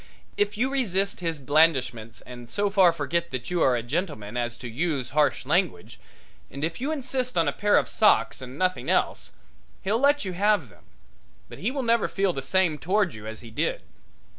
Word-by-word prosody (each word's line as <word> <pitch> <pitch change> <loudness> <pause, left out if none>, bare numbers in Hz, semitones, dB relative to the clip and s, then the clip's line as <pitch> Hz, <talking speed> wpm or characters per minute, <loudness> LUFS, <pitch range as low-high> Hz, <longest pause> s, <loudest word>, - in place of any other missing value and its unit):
If 205 0 0
you 255 +4 +1
resist 200 -7 0
his 165 -3 -2
blandishments 135 -6 +1
and 120 -1 -11
so 205 - 0
far 190 -4 +6
forget 170 +2 -2
that 130 +4 -5
you 175 -2 0
are 130 - +4
a 115 - -2
gentleman 125 - -3
as 120 -1 -2
to 125 - -7
use 135 +1 -2
harsh 150 +1 +1
language, - - -1 0.5
and 140 +2 -7
if 165 +8 -3
you 280 +4 -1
insist 255 - -2
on 165 -2 +3
a - - +2
pair 205 0 +3
of - - +2
socks 210 -9 +3
and 130 +1 -9
nothing 185 +1 -1
else, - - 0 0.5
he'll 205 +4 +1
let 285 -2 +3
you 185 - -3
have 200 - +2
them, - - -21 0.6
but - - -10
he 210 - 0
will 270 0 -3
never 235 -2 +2
feel 195 -2 0
the 135 - -4
same 165 +1 +1
toward 190 +1 +1
you 110 0 -9
as 110 0 -7
he 115 -2 -11
did. 110 - -2
170 Hz, 200 wpm, -26 LUFS, 130-205 Hz, 0.6 s, far